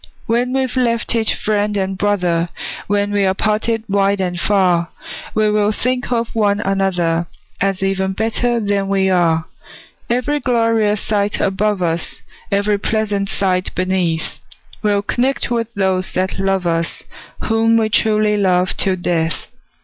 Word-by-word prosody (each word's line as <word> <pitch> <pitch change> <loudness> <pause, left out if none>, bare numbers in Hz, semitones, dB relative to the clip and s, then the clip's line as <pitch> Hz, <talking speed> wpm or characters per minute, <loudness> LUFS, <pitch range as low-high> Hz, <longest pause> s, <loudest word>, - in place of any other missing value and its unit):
When 240 +2 +1
we've 265 -1 -1
left 235 -3 +1
each 225 -2 +2
friend 210 -1 0
and 190 0 -1
brother, 180 -4 0 0.4
When 205 0 +1
we're 195 -2 +2
parted 220 +2 0
wide 200 0 +1
and 180 -2 -2
far, 180 -4 +2 0.5
We 215 -1 +3
will 210 0 +2
think 250 +3 -1
of 235 -1 -1
one 205 -2 +2
another, 180 -5 0 0.3
As 195 -1 0
even 190 0 0
better 230 +3 +1
than 200 -2 0
we 195 -1 +1
are. 165 -3 +2 0.6
Every 255 +5 0
glorious 230 -5 +1
sight 205 -1 -1
above 195 0 0
us, 165 -1 -2 0.3
Every 200 +1 +1
pleasant 205 -2 -1
sight 185 -2 0
beneath, 180 -3 0 0.4
We'll 205 -2 +1
connect 250 +3 0
with 230 -1 -1
those 190 -2 0
that 185 +1 -1
love 195 -1 0
us, 165 -1 -1 0.4
Whom 225 +1 +3
we 220 -1 +2
truly 215 -1 +2
love 185 -2 +2
till 190 -2 +2
death! 165 -2 -1
200 Hz, 140 wpm, -18 LUFS, 185-220 Hz, 0.6 s, We